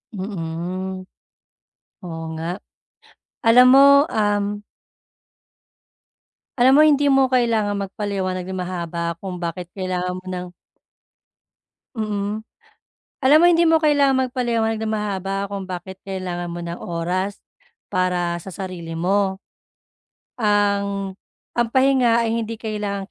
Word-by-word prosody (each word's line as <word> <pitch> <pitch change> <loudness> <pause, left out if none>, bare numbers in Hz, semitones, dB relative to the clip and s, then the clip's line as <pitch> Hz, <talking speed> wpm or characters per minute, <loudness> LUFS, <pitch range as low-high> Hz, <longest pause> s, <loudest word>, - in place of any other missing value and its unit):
Mm. 185 0 -4 1.0
Oo 165 -2 -6
nga, 165 +4 -4 0.8
alam 245 +1 +7
mo, 280 +2 +7
um. 205 -2 -1 2.0
Alam 255 +2 +5
mo 290 - +7
hindi 290 -2 +4
mo 270 -2 +4
kailangang 225 -5 +1
magpaliwanag 195 -2 -3
ng 190 - -4
mahaba 170 -2 -3
kung 185 -2 -5
bakit 170 0 -5
kailangan 180 -1 -2
mo 185 - -11
ng 180 -1 -5 1.5
Mm. 210 -1 -3 0.8
Alam 280 +4 +7
mo - - +6
hindi 340 0 +4
mo 325 0 +5
kailangang 280 -4 +3
magpaliwanag 230 -3 0
ng 220 - -2
mahaba 195 -2 -2
kung 200 -1 -4
bakit 185 +1 -7
kailangan 180 -3 -4
mo 175 - -6
ng 170 0 -5
oras 180 +4 -2 0.5
para 180 -2 0
sa 190 - -8
sarili 180 -3 -6
mo. 190 +2 +1 1.0
Ang 200 -2 +1 0.4
ang 240 -1 +1
pahinga 260 -3 +3
ay 225 - 0
hindi 225 +1 -5
kailangang 210 -3 -4
200 Hz, 115 wpm, -21 LUFS, 185-230 Hz, 2.0 s, alam